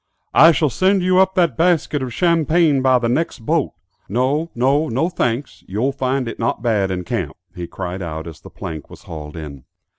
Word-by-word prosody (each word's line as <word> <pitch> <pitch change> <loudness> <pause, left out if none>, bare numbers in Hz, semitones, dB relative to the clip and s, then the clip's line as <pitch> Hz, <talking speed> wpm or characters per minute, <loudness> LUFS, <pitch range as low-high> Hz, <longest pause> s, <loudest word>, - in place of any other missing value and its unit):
"I 165 +2 +8
shall 155 -3 +1
send 185 - +2
you 185 0 +3
up 190 0 +3
that 170 - +2
basket 165 -3 +1
of 130 -1 -4
champagne 165 -2 +2
by 130 -1 +4
the 120 -1 -1
next 125 -2 -1
boat; 160 0 +1 0.4
no, 135 - 0
no; 140 +6 +2
no 135 +9 0
thanks; 125 -5 -2
you'll 110 +8 0
find 135 -1 -1
it 115 - -6
not 115 -1 -1
bad 105 -5 +1
in 90 -1 -3
camp," - - -3 0.2
he 90 -2 -6
cried 95 +1 -5
out 80 -2 -5
as 80 -2 -10
the - - -12
plank 80 -3 -7
was - - -13
hauled 75 -1 -8
in. 70 -5 -8
130 Hz, 200 wpm, -20 LUFS, 95-160 Hz, 0.4 s, I